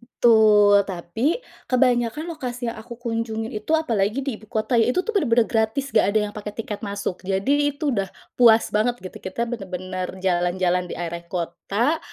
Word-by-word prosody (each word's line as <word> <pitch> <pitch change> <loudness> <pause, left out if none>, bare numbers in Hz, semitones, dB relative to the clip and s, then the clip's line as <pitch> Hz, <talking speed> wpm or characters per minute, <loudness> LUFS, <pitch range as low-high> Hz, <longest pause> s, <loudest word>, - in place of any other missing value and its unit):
Betul. 210 -4 +5
Tapi 205 - -2 0.2
kebanyakan 250 +4 +1
lokasi 245 -6 -4
yang - - -9
aku 235 +2 -9
kunjungin 225 -1 -3
itu, 215 +8 -4
apalagi 230 -6 +1
di 260 -5 -3
ibu 215 - -17
kota, 220 +3 -1
ya, 225 - +4
itu 255 - +1
tuh 455 - -2
bener-bener 240 - +3
gratis, 230 +5 0
nggak 215 -3 +4
ada 215 - +3
yang - - -17
pakai 210 0 -6
tiket 215 -2 -5
masuk. 200 -2 -3
Jadi 280 +10 +1
itu 290 0 -1
udah 195 -4 -1 0.3
puas 230 -2 +6
banget, 230 +3 +2
gitu. 185 - -8
Kita 190 +5 -4
bener-bener 185 -4 -4 0.2
jalan-jalan 180 0 +1
di - - -4
area 170 0 -5
kota, 195 - -1
220 Hz, 175 wpm, -23 LUFS, 195-245 Hz, 0.3 s, puas